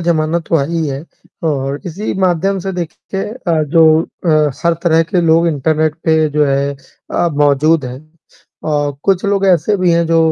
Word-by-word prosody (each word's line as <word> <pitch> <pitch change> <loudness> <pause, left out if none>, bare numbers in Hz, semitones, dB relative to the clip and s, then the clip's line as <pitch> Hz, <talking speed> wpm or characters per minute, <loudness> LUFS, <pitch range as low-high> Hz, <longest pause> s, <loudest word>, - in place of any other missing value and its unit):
ज़माना 165 -1 0
तो 165 - +3
आई 165 +4 -1
है 140 +1 -5 0.5
और 140 0 -3
इसी 185 +5 -4
माध्यम 190 +2 +1
से 190 +2 -4
देखिए 180 +2 -5
अ, 175 -9 -2
जो 160 +1 +4
अ, 155 -4 0
सर 170 0 +2
तरह 165 -2 +3
के 170 +2 -1
लोग 165 0 +3
इंटरनेट 155 +1 0
पे 160 -1 +3
जो 150 +1 +2
है 140 +1 0 0.4
अ, 175 - +1
मौजूद 145 +1 +2
हैं 125 +1 -7 0.7
और 145 -1 0
कुछ 195 -1 +1
लोग 200 -1 +1
ऐसे 185 +3 +2
भी 180 -2 +1
हैं 170 0 +2
जो 165 0 +2
160 Hz, 175 wpm, -15 LUFS, 150-175 Hz, 0.7 s, जो